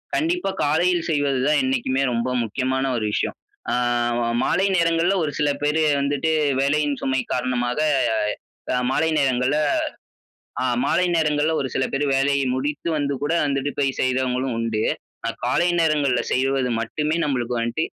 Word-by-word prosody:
கண்டிப்பா, 340 Hz, -, 0 dB
காலையில 175 Hz, +4 st, +2 dB
செய்வது 145 Hz, -3 st, +1 dB
தான் 150 Hz, -, +3 dB
என்னைக்குமே 250 Hz, -, 0 dB
ரொம்ப 115 Hz, +2 st, -1 dB
முக்கியமான 130 Hz, +4 st, -1 dB
ஒரு 110 Hz, -, -2 dB
விஷயம். -, -, -1 dB, 0.4 s
அ -, -, +1 dB, 0.7 s
மாலை 190 Hz, -, +2 dB
நேரங்கள்ல 170 Hz, +2 st, +2 dB
ஒரு 150 Hz, -, -1 dB
சில 145 Hz, -1 st, +2 dB
பேரு 150 Hz, +2 st, +1 dB, 0.2 s
வந்துட்டு 145 Hz, +3 st, 0 dB, 0.3 s
வேலையின் 145 Hz, +1 st, +1 dB
சுமை 130 Hz, -1 st, 0 dB
காரணமாக, 125 Hz, +1 st, -1 dB, 1.0 s
அ -, -, +2 dB
மாலை 160 Hz, +4 st, +1 dB
நேரங்கள்ல 130 Hz, +1 st, +1 dB, 1.1 s
அ -, -, 0 dB, 0.2 s
மாலை 180 Hz, +2 st, +2 dB
நேரங்கள்ல 150 Hz, 0 st, +1 dB
ஒரு 130 Hz, -, -2 dB
சில 130 Hz, -, +1 dB
பேர் 140 Hz, +2 st, 0 dB
வேலையை 140 Hz, 0 st, +2 dB
முடித்து 145 Hz, +5 st, -3 dB
வந்து 140 Hz, -1 st, -1 dB
கூட 145 Hz, +2 st, 0 dB
வந்துட்டு 140 Hz, 0 st, -1 dB
போய் 135 Hz, -2 st, 0 dB
செய்தவங்களும் 130 Hz, 0 st, 0 dB
உண்டு. 115 Hz, -2 st, -1 dB, 0.6 s
காலை 175 Hz, +8 st, +2 dB
நேரங்கள்ல 150 Hz, -5 st, +2 dB
செய்வது 135 Hz, 0 st, +1 dB
மட்டுமே 150 Hz, +7 st, -1 dB
நம்மளுக்கு 125 Hz, -4 st, -1 dB
வந்துட்டு 115 Hz, +7 st, -1 dB
140 Hz, 140 wpm, -22 LUFS, 130-155 Hz, 1.1 s, தான்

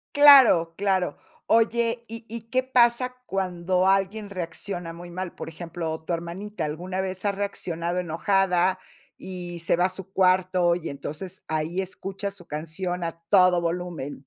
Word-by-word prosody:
Claro, 260 Hz, -, +8 dB
claro. 190 Hz, -5 st, 0 dB, 0.3 s
Oye, 230 Hz, +1 st, +2 dB
¿y 230 Hz, 0 st, -8 dB
y 230 Hz, 0 st, -6 dB
qué 255 Hz, +1 st, +1 dB
pasa 250 Hz, 0 st, +3 dB
cuando 185 Hz, -1 st, 0 dB
alguien 195 Hz, +2 st, +1 dB
reacciona 175 Hz, -1 st, -5 dB
muy 175 Hz, +1 st, -10 dB
mal? 185 Hz, 0 st, -5 dB
Por -, -, -6 dB
ejemplo, 165 Hz, -1 st, -5 dB
tu 170 Hz, -, -3 dB
hermanita 170 Hz, +3 st, -4 dB
alguna 180 Hz, +5 st, -4 dB
vez 190 Hz, +1 st, -4 dB
ha 200 Hz, -, +3 dB
reaccionado 180 Hz, -3 st, -3 dB
enojada 185 Hz, +1 st, +1 dB, 0.4 s
y 175 Hz, -2 st, -7 dB
se 170 Hz, -, +2 dB
va 180 Hz, +1 st, +2 dB
a -, -, +2 dB
su 190 Hz, 0 st, -8 dB
cuarto 185 Hz, -2 st, +3 dB
y, 170 Hz, -2 st, -5 dB
entonces, 155 Hz, +6 st, -6 dB
ahí 160 Hz, +4 st, -1 dB
escucha 195 Hz, +1 st, -5 dB
su 180 Hz, -3 st, -11 dB
canción 170 Hz, +4 st, -4 dB
a 165 Hz, -, -1 dB, 0.2 s
todo 180 Hz, -3 st, +5 dB
volumen. 170 Hz, -4 st, -3 dB
185 Hz, 150 wpm, -25 LUFS, 170-195 Hz, 0.4 s, Claro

